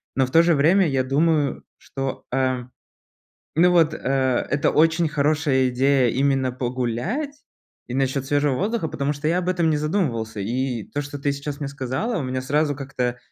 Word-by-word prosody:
Но 130 Hz, -, +3 dB
в 130 Hz, -, -9 dB
то 165 Hz, -, +6 dB
же 170 Hz, -1 st, +3 dB
время 170 Hz, +6 st, +4 dB
я 135 Hz, -3 st, +1 dB
думаю, 145 Hz, +2 st, +1 dB
что 135 Hz, -1 st, -5 dB
э 130 Hz, -1 st, 0 dB, 0.9 s
ну 180 Hz, +2 st, +5 dB
вот 165 Hz, -3 st, +4 dB
э, -, -, -5 dB
это 135 Hz, +1 st, 0 dB
очень 165 Hz, +2 st, +3 dB
хорошая 145 Hz, -3 st, +1 dB
идея 130 Hz, 0 st, +2 dB
именно 135 Hz, 0 st, +1 dB
погулять, 125 Hz, -, -2 dB, 0.5 s
и 120 Hz, -, -6 dB
насчет 135 Hz, 0 st, 0 dB
свежего 145 Hz, -1 st, +1 dB
воздуха, 205 Hz, -, -1 dB
потому 140 Hz, +1 st, -1 dB
что 150 Hz, +1 st, -4 dB
я 170 Hz, -, +2 dB
об 180 Hz, -1 st, -2 dB
этом 175 Hz, -3 st, +1 dB
не 155 Hz, -, +1 dB
задумывался. 135 Hz, -, -1 dB
И 120 Hz, +2 st, -2 dB
то, 145 Hz, -, -2 dB
что 145 Hz, 0 st, -7 dB
ты 140 Hz, 0 st, 0 dB
сейчас 140 Hz, +1 st, -5 dB
мне 140 Hz, -, -3 dB
сказала, 140 Hz, -, -3 dB
у 155 Hz, -, -2 dB
меня 130 Hz, 0 st, -3 dB
сразу 145 Hz, +2 st, 0 dB
как-то 125 Hz, -3 st, -3 dB
140 Hz, 180 wpm, -23 LUFS, 130-160 Hz, 0.9 s, то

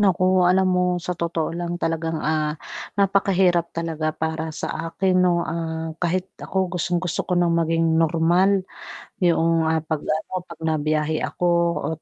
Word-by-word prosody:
Naku, 185 Hz, -2 st, +3 dB
alam 185 Hz, 0 st, +3 dB
mo 180 Hz, 0 st, +2 dB
sa 175 Hz, +1 st, -3 dB
totoo 170 Hz, -1 st, -2 dB
lang 175 Hz, 0 st, -3 dB
talagang, 165 Hz, -1 st, -2 dB
ah, 155 Hz, 0 st, 0 dB, 0.4 s
napakahirap 190 Hz, -4 st, +2 dB
talaga 160 Hz, -2 st, -2 dB
para 160 Hz, +1 st, -3 dB
sa 160 Hz, +1 st, -4 dB
akin, 185 Hz, +2 st, +1 dB
'no, 175 Hz, -2 st, +2 dB
ah, 160 Hz, -1 st, -4 dB
kahit 180 Hz, +1 st, 0 dB, 0.2 s
ako 190 Hz, -2 st, -2 dB
gustong-gusto 175 Hz, 0 st, -1 dB
ko 180 Hz, -, +1 dB
ng 175 Hz, -1 st, +3 dB
maging 165 Hz, -1 st, +2 dB
normal. 175 Hz, +4 st, +3 dB, 0.5 s
Yung 165 Hz, -2 st, +2 dB
'pag 160 Hz, -1 st, 0 dB
ano, 155 Hz, +3 st, -2 dB
'pag 170 Hz, -2 st, -12 dB
nabiyahe 155 Hz, 0 st, 0 dB
ako 175 Hz, -, -1 dB, 0.3 s
o -, -, -2 dB
170 Hz, 145 wpm, -23 LUFS, 160-180 Hz, 0.5 s, Naku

